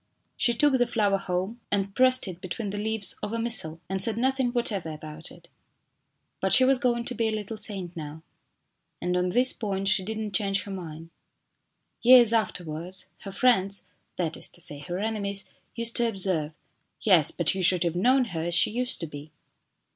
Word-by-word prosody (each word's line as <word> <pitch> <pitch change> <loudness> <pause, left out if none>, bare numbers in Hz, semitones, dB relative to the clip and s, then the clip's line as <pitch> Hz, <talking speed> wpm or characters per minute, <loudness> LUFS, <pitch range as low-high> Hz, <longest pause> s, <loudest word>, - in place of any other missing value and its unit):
She 235 - +1
took 270 +1 +2
the 245 - +2
flower 205 -4 +1
home 190 +5 -4
and 200 -1 -1
pressed 255 -1 +3
it 180 -1 -8
between 195 +3 -5
the 205 - -5
leaves 220 -1 0
of 210 - -4
a - - -1
missal, 225 -9 +2
and 190 0 -2
said 225 0 +1
nothing 260 +1 +1
whatever 225 -8 -2
about 155 +1 -5
it. - - -15 0.9
But - - +1
she 260 - +7
was 265 0 +3
going 240 -1 0
to 250 - -3
be 230 -1 -1
a - - -1
little 215 0 -5
saint 190 -4 -3
now, 155 0 -8 0.8
and 180 +1 -2
on 180 0 0
this 250 +7 +4
point 195 -3 -3
she 210 -1 +2
did 220 +3 -5
not 215 -2 -5
change 195 -2 0
her 200 - -9
mind. 165 -3 -8 0.9
Years 240 -2 +7
afterwards, 180 -4 -3
her 195 - -9
friends 200 -3 +1 0.3
that 165 -3 -2
is - - -2
to 175 - -13
say 145 -4 -2
her 175 +4 -6
enemies 200 -1 0 0.2
used 230 0 0
to 235 -1 +2
observe: 185 -7 0 0.3
" - - -46
Yes, 180 -8 +6
but 170 - -1
you 190 - -3
should 180 -1 +5
have 170 -1 -2
known 255 +8 +3
her 160 - -3
as 175 0 -1
she 165 - +5
used 245 0 -1
to - - -3
be." 150 0 -10
200 Hz, 200 wpm, -26 LUFS, 175-230 Hz, 0.9 s, she